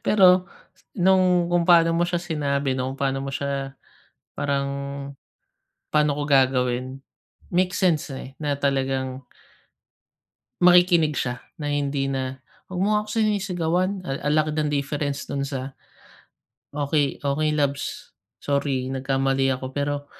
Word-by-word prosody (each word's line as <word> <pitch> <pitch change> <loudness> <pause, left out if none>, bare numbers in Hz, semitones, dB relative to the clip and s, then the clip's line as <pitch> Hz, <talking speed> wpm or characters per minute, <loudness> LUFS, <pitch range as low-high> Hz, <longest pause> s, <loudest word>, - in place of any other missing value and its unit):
Pero 185 -2 +5 0.5
nung 180 -1 +4
kung 175 0 +2
paano 165 -1 +5
mo 170 - +2
siya 175 0 -1
sinabi, 145 -5 -1
nung 130 +1 -3
paano 135 0 -1
mo 135 - -4
siya 140 0 -3 0.7
parang 140 -1 -1 1.2
paano 150 -1 +2
ko 145 - -1
gagawin, 130 -1 +2 0.5
makes 180 +1 0
sense 160 -6 +1
eh, 135 0 -8
na 145 -2 -2
talagang 135 -1 -1 1.4
makikinig 175 -4 +5
siya 125 0 -3 0.2
na 150 - -4
hindi 140 -1 -1
na, 130 -1 -3 0.3
"Wag 180 - -4
mo 195 - +2
nga 210 - +4
ako 215 - -13
sinisigawan." 190 -3 0
Ah 135 - -4
ang - - +2
laki 155 0 +1
ng 150 -1 0
difference 140 0 -2
dun 140 -1 -3
sa, 135 -1 -5 1.0
"Okey, 145 -1 0
okey 155 +2 +1
labs. 140 -1 -2 0.2
Sorry 140 -2 -1
nagkamali 135 0 +1
ako, 130 0 -7
pero 145 0 -2
145 Hz, 130 wpm, -24 LUFS, 135-170 Hz, 1.4 s, Pero